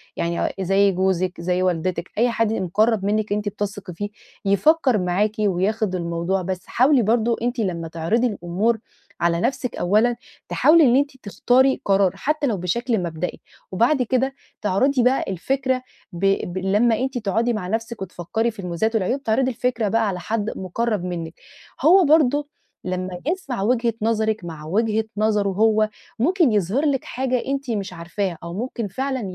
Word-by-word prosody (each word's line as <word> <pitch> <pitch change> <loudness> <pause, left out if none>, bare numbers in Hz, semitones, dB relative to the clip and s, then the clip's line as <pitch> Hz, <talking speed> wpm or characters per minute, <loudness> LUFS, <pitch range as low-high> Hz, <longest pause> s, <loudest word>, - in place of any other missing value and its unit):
يعني 170 0 -2
آآ، - - -1
زيّ 195 +2 +3
جوزِك، 185 -1 0
زيّ 180 +1 0
والدتِك، 180 0 -1
أي 240 +3 +3
حد 225 -2 +1
يبقى 220 - -1
مُقرَّب 210 +3 +1
منِّك 210 0 0
أنتِ 210 0 -1
بتثقي 200 -2 -5
فيه، 205 +5 -4 0.4
يفكِّر 260 +4 +3
معاكِ 185 +3 +1
وياخُد 205 +1 0
الموضوع 170 +2 -1
بس 185 0 -4
حاولي 260 +1 +4
برضه 230 +1 +2
أنتِ 245 +1 -1
لمّا 170 -6 -2
تعرضي 170 +10 0
الأمور 205 +2 -1 0.4
على 170 0 +2
نَفْسِك 255 0 -1
أولًا، 215 +6 +2 0.3
تحاولي 325 +1 +5
إن 250 -3 +5
أنتِ 280 0 +1
تختاري 260 +4 +2
قرار 195 -2 +3
حتى 300 -1 -1
لو 215 - 0
بشكل 220 +6 -1
مبدئي، 170 +1 -4 0.3
وبعد 235 +9 +2
كده 260 +2 0 0.3
تعرضي 245 +6 +2
بقى 255 +2 +3
الفكرة، 260 +7 -1 0.3
ب 175 +3 -3 0.3
ب - - -4
لمّا 210 +5 +2
أنتِ 265 0 -2
تقعدي 225 +2 0
مع 215 -5 -3
نَفْسك 225 +2 -3
وتفكِّري 190 +5 -2
في 215 - -17
المميزات 190 +5 -1
والعيوب، 245 +7 0
تعرضي 255 +4 +1
الفكرة 240 -2 -1
بقى 225 +2 +1
على 185 -2 -2
حد 215 +3 -2
مُقرَّب 210 +2 -2
منِّك، 170 -3 -4 0.5
هو 365 +2 +7
برضه 290 -1 +3 0.4
لمّا 185 0 -4
يسمع 295 - -2
وجهة 235 +1 +1
نظرِك 220 -2 0
مع 160 -3 -8
وجهة 220 +5 0
نظره 210 -2 +2
هو، 215 +2 +2 0.3
ممكن 335 - +3
يظهر 210 - +1
لِك 275 -3 +1
حاجة 255 -1 -1
أنتِ 275 -2 -2
مش 200 -4 -3
عارفاها، 175 +1 -3
أو 170 0 -6
ممكن 230 +1 -3
فعلًا 265 +6 -3
215 Hz, 165 wpm, -22 LUFS, 185-245 Hz, 0.5 s, هو